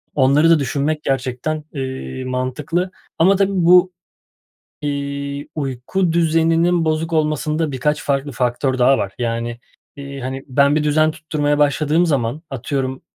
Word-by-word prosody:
onları 145 Hz, +4 st, +4 dB
da 165 Hz, -2 st, +5 dB
düşünmek 145 Hz, +3 st, -1 dB
gerçekten, 135 Hz, +3 st, -2 dB
eee, 130 Hz, -1 st, -5 dB
mantıklı 130 Hz, +8 st, -2 dB, 0.3 s
ama 190 Hz, +4 st, +5 dB
tabii 195 Hz, 0 st, +2 dB
bu, 180 Hz, +1 st, +6 dB, 0.9 s
iii, 140 Hz, 0 st, -4 dB
uyku 150 Hz, +6 st, -1 dB
düzeninin 165 Hz, +1 st, +2 dB
bozuk 160 Hz, +1 st, -1 dB
olmasında 155 Hz, 0 st, 0 dB
birkaç 150 Hz, +3 st, -1 dB
farklı 140 Hz, 0 st, -1 dB
faktör 125 Hz, +2 st, -1 dB
daha 130 Hz, +2 st, +4 dB
var. 100 Hz, 0 st, -3 dB
Yani, 120 Hz, 0 st, -2 dB, 0.4 s
eee, 140 Hz, -1 st, -8 dB
hani, 130 Hz, +1 st, -5 dB
ben 140 Hz, +2 st, +3 dB
bir 155 Hz, -, +1 dB
düzen 155 Hz, +1 st, +3 dB
tutturmaya 150 Hz, -2 st, -1 dB
başladığım 150 Hz, +3 st, +2 dB
zaman, 140 Hz, -2 st, -1 dB
atıyorum, 130 Hz, 0 st, -3 dB
145 Hz, 130 wpm, -19 LUFS, 130-155 Hz, 0.9 s, bu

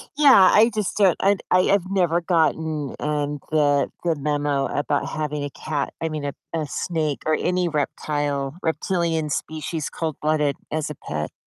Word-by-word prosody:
Yeah, 270 Hz, -11 st, +7 dB
I 220 Hz, +2 st, +6 dB
just 210 Hz, -4 st, -2 dB
don't 195 Hz, -5 st, +4 dB
I 200 Hz, +1 st, +4 dB
d -, -, -14 dB
I 185 Hz, -, +5 dB
have 190 Hz, -2 st, +1 dB
never 175 Hz, -3 st, +2 dB
gotten, 160 Hz, -4 st, 0 dB
um, 145 Hz, -1 st, -2 dB
the 145 Hz, -2 st, +3 dB
the 165 Hz, -2 st, +1 dB
memo 145 Hz, -1 st, 0 dB
about 145 Hz, 0 st, -1 dB
having 150 Hz, -2 st, -3 dB
a 145 Hz, -, -3 dB
cat 145 Hz, +1 st, -3 dB
I 165 Hz, -, -1 dB
mean, 155 Hz, -2 st, -4 dB
a 140 Hz, -, -3 dB, 0.2 s
a 155 Hz, -2 st, -1 dB
snake 155 Hz, -2 st, -2 dB
or 155 Hz, -, +2 dB
any 180 Hz, +1 st, 0 dB
reptile 145 Hz, -2 st, -2 dB
reptilian 165 Hz, -2 st, -1 dB
species, 155 Hz, 0 st, -3 dB
cold-blooded, 155 Hz, -2 st, -1 dB, 0.2 s
as 155 Hz, -1 st, -2 dB
a -, -, -7 dB
pet. 75 Hz, -10 st, -5 dB
155 Hz, 170 wpm, -23 LUFS, 145-170 Hz, 0.2 s, Yeah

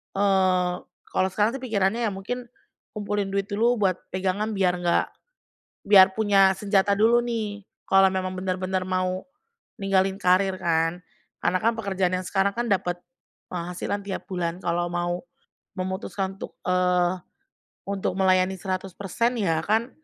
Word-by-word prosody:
eee, 185 Hz, -2 st, +2 dB, 0.3 s
kalau 190 Hz, -, +1 dB
sekarang 215 Hz, +6 st, +1 dB
sih 260 Hz, -, -13 dB
pikirannya 220 Hz, -1 st, 0 dB
ya -, -, -1 dB
mungkin 240 Hz, +6 st, -5 dB, 0.5 s
kumpulin 205 Hz, -1 st, -2 dB
duit 195 Hz, 0 st, -1 dB
dulu 230 Hz, +3 st, +2 dB
buat 190 Hz, -3 st, +3 dB, 0.2 s
pegangan 190 Hz, +3 st, -1 dB
biar 185 Hz, -2 st, +2 dB
nggak 175 Hz, -1 st, +2 dB, 0.8 s
biar 195 Hz, -2 st, +7 dB
punya 200 Hz, -3 st, +5 dB
senjata 200 Hz, 0 st, +2 dB
dulu 230 Hz, +3 st, +4 dB
nih. 215 Hz, -4 st, -3 dB, 0.2 s
Kalau 195 Hz, 0 st, +6 dB
memang 185 Hz, -1 st, -2 dB
benar-benar 185 Hz, 0 st, -2 dB
mau 185 Hz, 0 st, -1 dB, 0.5 s
ninggalin 195 Hz, -1 st, +2 dB
karir 185 Hz, +1 st, +3 dB
kan, 165 Hz, +1 st, 0 dB, 0.4 s
karena 185 Hz, -, +2 dB
kan 230 Hz, +1 st, +3 dB
pekerjaan 190 Hz, -4 st, 0 dB
yang 185 Hz, -, -3 dB
sekarang 195 Hz, +1 st, +1 dB
kan 240 Hz, 0 st, -1 dB
dapat 180 Hz, -2 st, +1 dB, 0.6 s
penghasilan 180 Hz, +3 st, -3 dB
tiap 195 Hz, -, -4 dB
bulan 175 Hz, -2 st, -2 dB
kalau 175 Hz, 0 st, 0 dB
mau 175 Hz, 0 st, -1 dB, 0.6 s
memutuskan 190 Hz, +1 st, -3 dB
untuk, -, -, -8 dB
eee, 180 Hz, 0 st, +2 dB, 0.7 s
untuk 195 Hz, -2 st, -2 dB
melayani 185 Hz, 0 st, +3 dB
100% 195 Hz, +5 st, -2 dB
ya 165 Hz, -6 st, +1 dB
kan 225 Hz, +6 st, +1 dB
190 Hz, 140 wpm, -25 LUFS, 185-205 Hz, 0.8 s, biar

